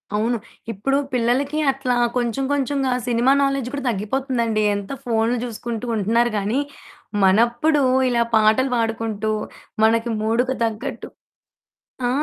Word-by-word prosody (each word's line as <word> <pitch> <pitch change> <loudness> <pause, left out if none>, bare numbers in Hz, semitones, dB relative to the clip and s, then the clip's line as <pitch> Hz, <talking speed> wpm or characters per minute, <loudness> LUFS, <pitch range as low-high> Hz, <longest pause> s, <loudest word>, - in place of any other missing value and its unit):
అవును. 230 +3 +1 0.3
ఇప్పుడు 270 +7 0 0.2
పిల్లలకి 260 +5 +1
అట్లా 260 -2 -1 0.2
కొంచెం, 240 +2 -1
కొంచెంగా 275 -1 0 0.2
సినిమా 240 +2 +3
నాలెడ్జ్ 275 -3 0
కూడా 280 -1 -4
దగ్గిపోతుందండి. 230 +1 -1
ఎంత 200 +2 -5
ఫోన్లు 230 +1 +1
జూసుకుంటూ 235 0 -5
ఉంటున్నారు 230 +3 +2
గాని, 210 +7 0 0.6
మనప్పుడు 240 +10 +3 0.3
ఇలా 235 -1 +2
పాటలు 220 +5 +3
పాడుకుంటూ, 225 -1 -1 0.5
మనకి 230 +1 +3
మూడుకి 245 +4 +1
తగ్గట్టు, 225 -1 -4 1.0
ఆ! - - +1
235 Hz, 115 wpm, -21 LUFS, 220-260 Hz, 1.0 s, సినిమా